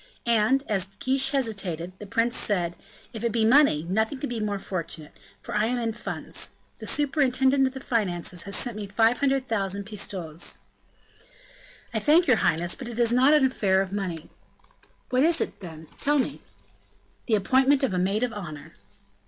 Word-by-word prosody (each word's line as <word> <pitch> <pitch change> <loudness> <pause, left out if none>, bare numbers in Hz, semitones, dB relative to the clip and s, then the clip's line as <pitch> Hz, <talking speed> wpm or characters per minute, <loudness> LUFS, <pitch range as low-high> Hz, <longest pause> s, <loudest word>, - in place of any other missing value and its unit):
And, 235 +3 +3
as 195 -2 -1
Guiche 265 +1 +3
hesitated, 195 - -2
the 210 - -8
prince 230 +4 +1
said: 175 -4 0 0.4
"If 225 -1 -6
it 235 - +1
be 225 -1 +2
money, 245 - +5
nothing 220 +9 0
could 275 -2 -4
be 235 - -2
more 210 -1 -1
fortunate, 170 -5 -6 0.3
for - - -7
I 215 +1 +2
am 250 +1 -1
in 230 -2 -1
funds; 235 - -5 0.3
the - - -7
superintendent 270 -2 +2
of 260 - -5
the - - -5
finances 180 -9 -2
has 200 0 -3
sent 240 -2 -1
me 205 -1 -5
500,000 225 -3 +1
pistoles." 185 -6 -4 1.4
"I - - +1
thank 320 +4 +4
your 250 -8 +4
highness; 175 -1 +1
but 260 -3 -6
is 235 0 +1
not 260 +5 +5
an 295 -3 +4
affair 195 -7 +2
of 190 0 -2
money." 180 -6 -4 0.8
"What 255 0 +3
is 330 +3 +3
it, - - -3
then? 160 -4 -9
Tell 295 +1 +2
me." 265 - -1 0.9
"The 225 - +3
appointment 265 +7 +3
of 255 - +1
a 180 - 0
maid 195 +5 0
of 245 -2 -1
honor." 155 -6 -8
220 Hz, 170 wpm, -26 LUFS, 190-260 Hz, 1.4 s, money